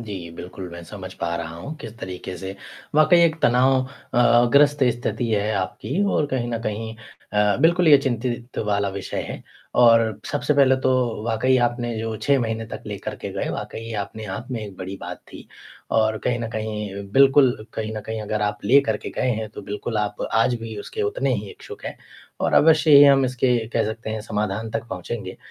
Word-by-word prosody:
जी 95 Hz, -7 st, -7 dB
बिल्कुल, 90 Hz, +2 st, -8 dB
मैं 85 Hz, -, -8 dB
समझ -, -, -8 dB
पा 85 Hz, 0 st, -3 dB
रहा 85 Hz, -1 st, -5 dB
हूँ 140 Hz, -, -7 dB
किस 115 Hz, -1 st, -9 dB
तरीके 90 Hz, -1 st, -6 dB
से 95 Hz, +1 st, -6 dB, 0.4 s
वाक़ई 155 Hz, +3 st, +6 dB
एक 165 Hz, -2 st, +4 dB
तनाव 125 Hz, +2 st, +4 dB, 0.4 s
अ -, -, +3 dB
अ, 120 Hz, 0 st, +5 dB
ग्रस्त 145 Hz, 0 st, +5 dB
स्थिति 120 Hz, 0 st, -2 dB
है 105 Hz, 0 st, +1 dB
आपकी 100 Hz, -, -2 dB
और 150 Hz, -, +1 dB
कहीं 130 Hz, -4 st, -2 dB
न 115 Hz, -, -1 dB
कहीं 110 Hz, +1 st, -4 dB, 0.4 s
अ, 105 Hz, -1 st, +3 dB
बिल्कुल 170 Hz, +1 st, +4 dB
ये 145 Hz, -2 st, +9 dB
चिंतित 120 Hz, -2 st, -3 dB
वाला 100 Hz, -1 st, +1 dB
विषय 95 Hz, 0 st, -4 dB
है -, -, -7 dB, 0.4 s
और 115 Hz, -3 st, +5 dB
सबसे 145 Hz, +1 st, 0 dB
पहले 135 Hz, -2 st, +5 dB
तो 125 Hz, -4 st, +1 dB
वाक़ई 120 Hz, +3 st, +2 dB
आपने 120 Hz, 0 st, -3 dB
जो 110 Hz, 0 st, -3 dB
6 140 Hz, +5 st, +2 dB
महीने 115 Hz, -1 st, -2 dB
तक -, -, -8 dB
लेकर -, -, -5 dB
के -, -, -6 dB
गए -, -, -3 dB
वाक़ई 115 Hz, 0 st, -6 dB
अपने 110 Hz, +2 st, -7 dB
आप 125 Hz, -, -8 dB
में 120 Hz, -3 st, -3 dB
एक 100 Hz, -2 st, -10 dB
बड़ी 95 Hz, +1 st, -6 dB
बात -, -, -6 dB
थी -, -, -11 dB, 0.4 s
और 110 Hz, -1 st, +2 dB
कहीं 120 Hz, -1 st, +1 dB
न 115 Hz, -, -3 dB
कहीं 105 Hz, -2 st, -4 dB
बिल्कुल 135 Hz, -1 st, +5 dB, 0.2 s
कहीं 110 Hz, 0 st, -3 dB
न -, -, -3 dB
कहीं 110 Hz, 0 st, -4 dB
अगर 105 Hz, 0 st, -2 dB
आप 105 Hz, 0 st, -1 dB
लेकर 120 Hz, -1 st, +4 dB
के -, -, -7 dB
गए 130 Hz, -, -1 dB
हैं, 110 Hz, -2 st, -2 dB
तो 110 Hz, -, -9 dB
बिल्कुल 105 Hz, +3 st, -4 dB
आप 105 Hz, 0 st, -2 dB
आज 115 Hz, +2 st, +3 dB
भी 115 Hz, -1 st, -6 dB
उसके 435 Hz, -, -5 dB
उतने 420 Hz, +4 st, 0 dB
ही -, -, -4 dB
इच्छुक 425 Hz, -1 st, -11 dB
हैं -, -, -5 dB, 0.4 s
और -, -, 0 dB
अवश्य 155 Hz, 0 st, +5 dB
ही 145 Hz, -, +10 dB
हम 135 Hz, -1 st, +6 dB
इसके 125 Hz, -1 st, +1 dB
कह 115 Hz, -1 st, 0 dB
सकते 110 Hz, +1 st, -5 dB
हैं 110 Hz, 0 st, -3 dB
समाधान 105 Hz, +1 st, -3 dB
तक 115 Hz, +1 st, -3 dB
पहुँचेंगे, 95 Hz, +1 st, -5 dB
115 Hz, 200 wpm, -23 LUFS, 105-130 Hz, 0.4 s, ही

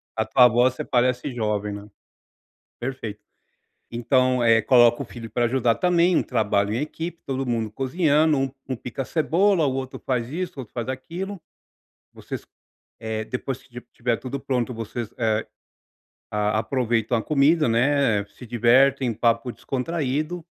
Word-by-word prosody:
a 110 Hz, -, 0 dB
tua 125 Hz, +3 st, +6 dB
voz 120 Hz, +2 st, +3 dB
você -, -, -5 dB
parece 125 Hz, +1 st, +1 dB
jovem, 105 Hz, -3 st, -1 dB
né. 100 Hz, 0 st, -8 dB, 0.9 s
Perfeito. 120 Hz, -5 st, -5 dB, 0.7 s
Então, 125 Hz, +1 st, +2 dB
eh, 115 Hz, -1 st, +5 dB
coloca 120 Hz, 0 st, +5 dB
o -, -, -4 dB
filho 115 Hz, -2 st, -9 dB
para 120 Hz, +3 st, 0 dB
ajudar 120 Hz, -1 st, +2 dB
também, 180 Hz, 0 st, +3 dB
um -, -, +3 dB
trabalho 105 Hz, -3 st, 0 dB
em -, -, 0 dB
equipe, 165 Hz, +3 st, -5 dB
todo 135 Hz, 0 st, -2 dB
mundo 115 Hz, -3 st, -1 dB
cozinhando, 150 Hz, +3 st, +2 dB
um 135 Hz, 0 st, -1 dB, 0.2 s
um 130 Hz, -, -1 dB
pica 125 Hz, +3 st, -5 dB
cebola, 170 Hz, +3 st, +2 dB
o 135 Hz, -, 0 dB
outro 130 Hz, -1 st, -5 dB
faz 125 Hz, -3 st, -1 dB
isso, 175 Hz, +5 st, -4 dB
o -, -, -7 dB
outro 115 Hz, -, -13 dB
faz 120 Hz, 0 st, -4 dB
aquilo, 170 Hz, +9 st, -5 dB, 0.7 s
vocês -, -, -7 dB, 0.5 s
eh, 110 Hz, 0 st, -3 dB
depois 125 Hz, +3 st, -4 dB
que -, -, -22 dB
esti 125 Hz, -2 st, -10 dB
estiver 120 Hz, -1 st, -1 dB
tudo 135 Hz, +2 st, -5 dB
pronto, 125 Hz, -2 st, -1 dB
vocês, 115 Hz, 0 st, -5 dB
eh, 110 Hz, -2 st, 0 dB, 0.8 s
a 105 Hz, 0 st, 0 dB
aproveitam 120 Hz, 0 st, 0 dB
a 110 Hz, -, -3 dB
comida, 150 Hz, +1 st, +3 dB
né, 115 Hz, -3 st, +2 dB
se 120 Hz, +4 st, -13 dB
divertem, 125 Hz, +2 st, +3 dB
papo 115 Hz, +2 st, +1 dB
descontraído, 155 Hz, +5 st, -3 dB
125 Hz, 155 wpm, -24 LUFS, 115-140 Hz, 0.9 s, tua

